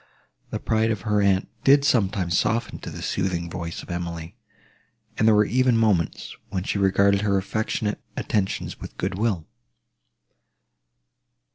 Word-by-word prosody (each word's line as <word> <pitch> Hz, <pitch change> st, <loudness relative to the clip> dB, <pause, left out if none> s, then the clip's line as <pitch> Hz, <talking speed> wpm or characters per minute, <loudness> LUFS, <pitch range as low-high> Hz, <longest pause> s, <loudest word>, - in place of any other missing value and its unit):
The -, -, -3 dB
pride 110 Hz, 0 st, +1 dB
of 110 Hz, -4 st, -1 dB
her 105 Hz, +1 st, +1 dB
aunt 95 Hz, -1 st, +2 dB, 0.2 s
did 140 Hz, +1 st, +5 dB
sometimes 100 Hz, -, +1 dB
soften 115 Hz, +2 st, 0 dB
to -, -, -7 dB
the -, -, -7 dB
soothing 85 Hz, -3 st, -2 dB
voice 85 Hz, -1 st, -5 dB
of -, -, -9 dB
Emily, 85 Hz, +1 st, -5 dB, 0.8 s
and 110 Hz, -, +2 dB
there 105 Hz, -1 st, +6 dB
even 125 Hz, +3 st, +2 dB
were 115 Hz, -, +3 dB
moments, 95 Hz, -9 st, 0 dB
when 90 Hz, -, -2 dB
she 100 Hz, -, -1 dB
regarded 100 Hz, +1 st, +3 dB
her 100 Hz, -2 st, +2 dB
affectionate 105 Hz, +1 st, -2 dB, 0.2 s
attentions 95 Hz, -3 st, -2 dB
with -, -, -10 dB
goodwill. 95 Hz, -2 st, -1 dB
100 Hz, 140 wpm, -24 LUFS, 90-110 Hz, 0.8 s, there